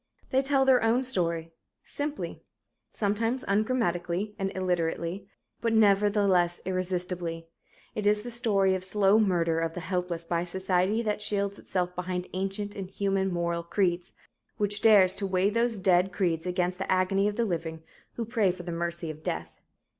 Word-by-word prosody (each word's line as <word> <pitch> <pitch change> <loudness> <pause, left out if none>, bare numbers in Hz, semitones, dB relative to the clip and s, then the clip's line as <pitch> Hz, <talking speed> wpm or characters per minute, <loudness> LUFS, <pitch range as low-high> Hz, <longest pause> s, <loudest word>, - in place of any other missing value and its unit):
They 265 0 +3
tell 270 -1 +2
their 260 -2 +5
own 230 +3 +2
story, 170 -9 0 0.3
simply 295 +1 -4 0.5
sometimes 225 +5 -1
ungrammatically 200 -3 0
and 195 0 -1
illiterately, 180 +1 -1 0.3
but 230 -1 +1
nevertheless 200 -4 +3
irresistibly. 180 -2 -3 0.5
It 210 -1 -1
is 210 0 +2
the 240 - -6
story 205 -5 +2
of 185 -1 -2
slow 195 +2 +3
murder 170 -6 +2
of 165 0 -2
the - - -3
helpless 180 -1 -3
by 170 0 0
a - - -3
society 190 +4 0
that 210 -1 -1
shields 200 -1 -1
itself 180 -1 -2
behind 180 0 -3
ancient, 195 +2 -3
inhuman 195 0 -1
moral 170 -1 -1
creeds 175 0 -1 0.4
which 205 0 0
dares 200 -4 +6
to 195 - -1
weigh 190 +2 +2
those 230 0 +1
dead 185 0 +3
creeds 175 -2 -1
against 180 0 -1
the 190 - -2
agony 185 +2 +2
of 210 - -2
the 235 - +1
living 160 -4 -4 0.3
who 235 - -3
pray 220 -4 +1
for 180 0 -4
the 175 - -5
"mercy 170 -1 -2
of 155 0 -12
death." - - -5
190 Hz, 160 wpm, -28 LUFS, 175-210 Hz, 0.5 s, dares